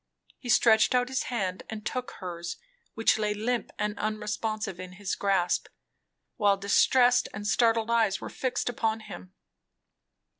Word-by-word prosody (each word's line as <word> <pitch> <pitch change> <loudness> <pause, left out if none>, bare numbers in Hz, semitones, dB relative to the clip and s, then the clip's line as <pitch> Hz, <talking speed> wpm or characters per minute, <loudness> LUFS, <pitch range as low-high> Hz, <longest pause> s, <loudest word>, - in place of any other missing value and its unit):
He 245 - -8
stretched 225 0 +5
out 250 0 +2
his 265 -1 -1
hand 190 -7 -2
and 215 -1 -7
took 250 -1 -3
hers, 175 -2 -6 0.4
which 225 0 +3
lay 210 -1 0
limp 235 +2 -2
and 210 0 -1
unresponsive 215 -2 -3
in 185 0 -8
his 195 +1 -4
grasp, 190 -3 +1 0.7
while 205 -4 +3
distressed 245 +5 +4
and 205 0 -6
startled 225 +1 +2
eyes 225 -5 +2
were - - -6
fixed 255 -2 -2
upon 225 -2 -1
him. 185 -3 -10
215 Hz, 145 wpm, -28 LUFS, 200-235 Hz, 0.7 s, stretched